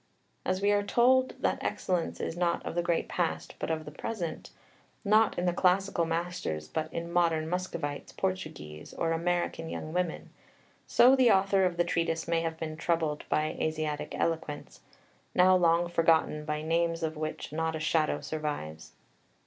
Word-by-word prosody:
As 185 +1 -1
we 205 - +4
are 205 0 +3
told 255 +5 +3
that - - 0
excellence 180 -3 -1
is - - -3
not 175 -1 0
of - - -3
the 175 - +1
great 170 -1 0
past, 175 -2 -2
but - - -3
of 160 -1 -2
the 150 - -8
present, 175 +1 -5 0.6
not 215 +1 +4
in 175 - 0
the 175 - +2
classical 185 -1 +2
masters, 165 - -3
but 155 - -3
in 170 +1 -4
modern 165 -3 +2
Muscovites, 170 -5 -3
Portuguese, 155 - -5
or 165 - 0
American 170 -1 -1
young 155 0 -5
women, 180 -2 -2 0.6
so 255 +2 +6
the 255 -3 +5
author 195 -1 +4
of 180 -1 -1
the 175 - +4
Treatise 165 -2 -1
may 165 0 +1
have 165 -1 -3
been 155 -1 -5
troubled 165 -3 -1
by 155 0 +1
Asiatic 155 -1 -2
eloquence, 160 -3 -3 0.5
now 185 +1 +6
long 170 -1 +3
forgotten, 165 -3 +2
by 150 0 -2
names 165 +1 0
of 160 0 -1
which 155 -1 -5
not 160 0 -1
a - - -3
shadow 155 0 +1
survives. 145 - -5
165 Hz, 165 wpm, -29 LUFS, 155-180 Hz, 0.6 s, so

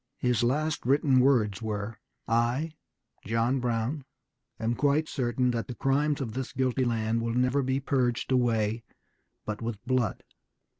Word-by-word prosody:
His 125 -3 +1
last 150 +6 0
written 135 0 +3
words 115 -7 +3
were, 105 -1 -4 0.3
"I, 120 +7 +1 0.5
John 115 +5 +1
Brown, 120 +4 -1 0.6
am 115 +1 0
quite 145 +5 +2
certain 125 -2 0
that 115 -1 -2
the 125 - -6
crimes 140 +4 +1
of 120 -6 -4
this 130 +1 -4
guilty 130 -1 +1
land 115 -1 0
will 115 0 -2
never 125 +3 +2
be 130 0 0
purged 130 -3 0
away 115 -3 +2 0.6
but 105 +1 -4
with 115 -2 -3
blood. 130 -3 0
125 Hz, 145 wpm, -28 LUFS, 115-135 Hz, 0.6 s, written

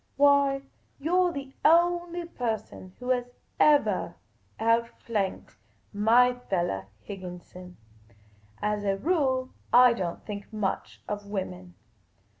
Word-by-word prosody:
Why, 280 -1 +4 0.4
you 320 +5 0
're - - -1
the 275 -3 -7
only 345 +1 +3
person 220 - -5
who 250 +1 -2
has 245 -1 0 0.3
evah 295 -1 +3 0.4
out 230 +1 +2
flanked 200 - -3 0.4
my 235 +5 +5 0.2
fellah, 175 - -1 0.2
Higginson. 180 -1 -9 0.9
As 210 0 0
a 195 -1 0
rule 260 - 0 0.2
I 245 0 +7
don't 180 -7 -4
think 205 0 -7
much 210 -3 -3
of 205 -1 -5
women. 90 - -5
230 Hz, 110 wpm, -27 LUFS, 195-275 Hz, 0.9 s, I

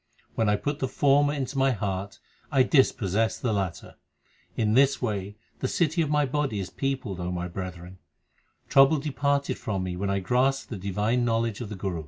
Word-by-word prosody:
When 110 -2 +1
I 105 - +3
put 145 +7 -3
the 130 - 0
former 145 +1 +3
into 140 -1 -3
my 135 0 +3
heart, 100 -1 -4 0.3
I 135 -3 +5
dispossess 115 - +2
the 120 -4 -1
latter. 95 -4 -4 0.6
In 110 -1 +1
this 135 +2 +4
way 105 -4 -3 0.2
the 130 - -1
city 165 +3 +1
of 155 - 0
my 150 -1 +2
body 135 -5 -1
is 95 - -5
peopled, 130 -9 -3
O 90 0 -3
my 90 0 -3
brethren. 90 0 -7 0.7
Trouble 135 +3 +6
departed 140 0 -1
from 95 -4 -2
me 90 -1 -3
when 100 +2 -2
I 100 - +1
grasped 125 +8 +1
the 110 - -4
divine 105 +6 0
knowledge 115 -2 0
of 115 - -5
the 105 - -5
Guru. 95 -3 -3
115 Hz, 190 wpm, -26 LUFS, 95-135 Hz, 0.7 s, Trouble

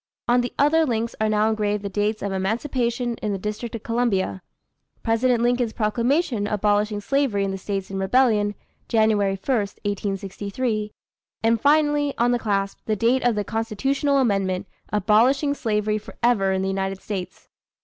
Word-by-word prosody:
On 245 +1 +4
the 245 - -3
other 315 +3 +4
links 230 -4 -1
are 215 - +2
now 215 0 +2
engraved 210 -1 -1
the - - -2
dates 210 +2 -1
of 200 - -2
Emancipation 235 +4 -1
in 210 -2 -2
the - - -2
District 215 +4 -5
of 225 - -7
Columbia; 220 - 0 0.6
President 235 +1 +2
Lincoln's 245 -2 +1
proclamation 235 +1 0
abolishing 210 0 +1
slavery 265 -4 +1
in 195 - -1
the 195 - -3
States 195 0 -4
in 195 - -3
rebellion, 210 -1 +2 0.3
Jan. 220 -2 +3
1, - - +1
1863; 205 +1 -2 0.5
and 225 0 +2
finally, 295 -1 +3
on 240 +1 +3
the 245 - +1
clasp, 200 -3 -1
the 215 - 0
date 235 +5 +2
of 245 -2 +2
the 210 - 0
Constitutional 255 +6 0
amendment, 195 -6 +1 0.3
abolishing 230 +8 +3
slavery 215 -4 -1
forever 215 -2 0
in 190 0 0
the - - -1
United 195 0 -2
States. 185 -3 -6
215 Hz, 160 wpm, -23 LUFS, 200-245 Hz, 0.6 s, On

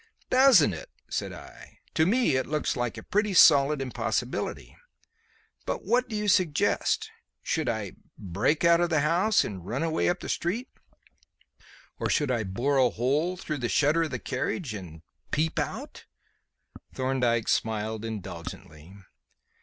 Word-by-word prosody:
"Doesn't 255 - +6
it?" 80 - -8 0.2
said - - -2
I. - - -13 0.2
"To 160 - +3
me 235 - +2
it 130 - 0
looks 150 +1 -1
like 120 -2 -2
a - - -8
pretty 210 -1 0
solid 145 -3 +6
impossibility. 130 - -3 0.9
But - - -3
what 250 +1 +1
do 220 - -4
you 210 0 -2
suggest? 195 - +1 0.3
Should 160 -6 -1
I 110 -5 -3 0.3
break 100 - 0
out 170 0 +5
of 175 - +1
the 155 -3 +2
house 175 +8 +3
and 95 -4 -6
run 120 - -3
away 165 -1 +1
up 175 +1 -1
the - - -6
street? 220 +9 -2 1.3
Or - - -1
should 145 -3 +1
I 120 -3 0
bore 120 +9 -1
a 125 -2 +5
hole 145 - 0
through 155 -5 -4
the 120 -1 -2
shutter 150 +3 +3
of 165 - 0
the - - -3
carriage 130 - -3
and 85 -6 -9 0.3
peep 160 +2 0
out?" - - -5 0.9
Thorndyke 125 -3 0
smiled 110 0 -1
indulgently. 90 -5 -8
145 Hz, 150 wpm, -27 LUFS, 110-175 Hz, 1.3 s, Doesn't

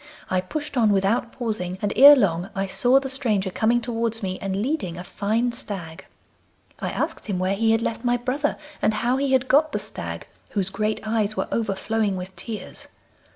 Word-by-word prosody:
I 185 0 +2
pushed 295 +9 -5
on 220 -3 +4
without 205 +5 +1
pausing, 210 -7 -3
and 205 0 -1
ere 285 +4 +10
long 180 -6 +1
I 195 0 0
saw 245 +7 +4
the 275 - -5
stranger 220 -8 0
coming 230 +5 +2
towards 230 -1 -1
me, 185 -1 -3
and 195 -1 -2
leading 220 - -2
a 180 - -6
fine 220 +6 -1
stag. 190 -9 -6 0.7
I - - -2
asked - - -3
him 200 -4 -1
where 185 +1 0
he 225 +2 +2
had 225 +1 +2
left 230 0 -3
my 245 0 +2
brother, 260 +4 -1 0.2
and 215 - +2
how 240 +4 +1
he 275 0 0
had 260 0 +3
got 300 +3 +4
the - - +1
stag, - - -6 0.2
whose 195 -2 -1
great 215 +2 -1
eyes 215 -1 0
were - - -1
overflowing 215 -1 -1
with 185 +1 -7
tears. 225 -3 -7
220 Hz, 195 wpm, -24 LUFS, 195-245 Hz, 0.7 s, ere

